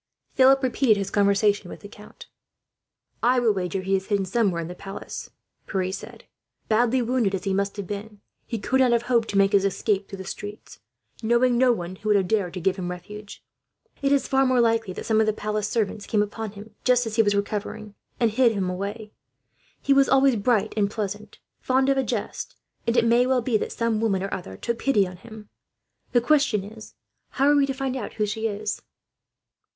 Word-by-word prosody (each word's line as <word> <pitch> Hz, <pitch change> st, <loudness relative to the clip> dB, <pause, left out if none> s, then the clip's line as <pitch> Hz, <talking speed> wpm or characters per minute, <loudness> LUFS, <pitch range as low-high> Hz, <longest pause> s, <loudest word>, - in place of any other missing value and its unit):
Philip 270 Hz, +1 st, +5 dB
repeated 245 Hz, -3 st, +3 dB
his 195 Hz, -1 st, -3 dB
conversation 200 Hz, -1 st, +2 dB
with -, -, -10 dB
the 205 Hz, -, -9 dB
count. 210 Hz, +1 st, -14 dB, 1.0 s
"I 250 Hz, +2 st, +3 dB
will 230 Hz, -3 st, +3 dB
wager 185 Hz, -1 st, -2 dB
he 195 Hz, +1 st, +1 dB
is 190 Hz, 0 st, -3 dB
hidden 200 Hz, -2 st, 0 dB
somewhere 190 Hz, -3 st, +1 dB
in 165 Hz, -, -4 dB
the 175 Hz, -, -6 dB
palace," 195 Hz, +2 st, -8 dB, 0.4 s
Pierre 185 Hz, -2 st, -1 dB
said. 195 Hz, -, -8 dB, 0.4 s
"Badly 240 Hz, +3 st, +2 dB
wounded 230 Hz, -5 st, +1 dB
as 185 Hz, -, -5 dB
he 195 Hz, -, -1 dB
must 200 Hz, +1 st, -1 dB
have 200 Hz, -, -4 dB
been, 205 Hz, +2 st, -7 dB, 0.3 s
he 230 Hz, -, -3 dB
could 255 Hz, +6 st, 0 dB
not 250 Hz, -2 st, +4 dB
have 235 Hz, 0 st, +2 dB
hoped 235 Hz, -2 st, +1 dB
to 200 Hz, -, -1 dB
make 195 Hz, 0 st, +4 dB
his 200 Hz, -1 st, +4 dB
escape 195 Hz, 0 st, 0 dB
through 195 Hz, -, -7 dB
the 190 Hz, -, -8 dB
streets, 205 Hz, +3 st, -8 dB, 0.4 s
knowing 240 Hz, +2 st, +3 dB
no 250 Hz, +1 st, +4 dB
one 185 Hz, -4 st, -4 dB
who 215 Hz, -, -4 dB
would 210 Hz, -, +5 dB
have 195 Hz, -2 st, +2 dB
dared 195 Hz, -3 st, 0 dB
to -, -, -3 dB
give 190 Hz, +2 st, 0 dB
him 180 Hz, -2 st, -4 dB
refuge. 205 Hz, +4 st, -9 dB, 0.6 s
It 275 Hz, 0 st, +1 dB
is 280 Hz, -1 st, +2 dB
far 270 Hz, 0 st, +3 dB
more 255 Hz, -1 st, +3 dB
likely 225 Hz, -3 st, +2 dB
that -, -, -6 dB
some 220 Hz, -1 st, +2 dB
of 220 Hz, -, +3 dB
the 215 Hz, -, +2 dB
palace 210 Hz, -1 st, -2 dB
servants 210 Hz, -2 st, -2 dB
came 210 Hz, -2 st, +2 dB
upon 210 Hz, 0 st, -6 dB
him, 210 Hz, +1 st, -12 dB
just 250 Hz, -1 st, +3 dB
as 220 Hz, 0 st, -4 dB
he -, -, +7 dB
was 205 Hz, -2 st, +2 dB
recovering, 210 Hz, +1 st, -3 dB, 0.3 s
and 230 Hz, -3 st, +3 dB
hid 235 Hz, 0 st, +3 dB
him 190 Hz, -3 st, -1 dB
away. 205 Hz, +3 st, -5 dB, 0.7 s
He 275 Hz, -, +4 dB
was 275 Hz, 0 st, +4 dB
always 270 Hz, -1 st, +4 dB
bright 220 Hz, 0 st, +1 dB
and 205 Hz, -2 st, +1 dB
pleasant, 210 Hz, 0 st, -5 dB, 0.2 s
fond 265 Hz, +1 st, +1 dB
of 275 Hz, -, +2 dB
a -, -, +1 dB
jest, 220 Hz, -3 st, -4 dB, 0.3 s
and 235 Hz, +1 st, +1 dB
it 235 Hz, -, +4 dB
may 240 Hz, +2 st, +4 dB
well 255 Hz, -2 st, +2 dB
be 235 Hz, -2 st, 0 dB
that -, -, -4 dB
some 230 Hz, -2 st, -1 dB
woman 195 Hz, -4 st, +1 dB
or 195 Hz, -, -4 dB
other 95 Hz, -, -6 dB
took 235 Hz, -, -3 dB
pity 210 Hz, -8 st, +2 dB
on 180 Hz, 0 st, -10 dB
him. 215 Hz, +1 st, -12 dB, 0.6 s
The 240 Hz, -, +3 dB
question 275 Hz, -6 st, +2 dB
is, 215 Hz, +2 st, -12 dB, 0.4 s
how 275 Hz, +1 st, +2 dB
are 290 Hz, -, +5 dB
we 280 Hz, -1 st, +3 dB
to 270 Hz, -, -1 dB
find 265 Hz, -1 st, -2 dB
out 260 Hz, -, -5 dB
who 215 Hz, -, 0 dB
she 220 Hz, +2 st, -2 dB
is?" 210 Hz, 0 st, -4 dB
215 Hz, 220 wpm, -24 LUFS, 200-240 Hz, 1.0 s, he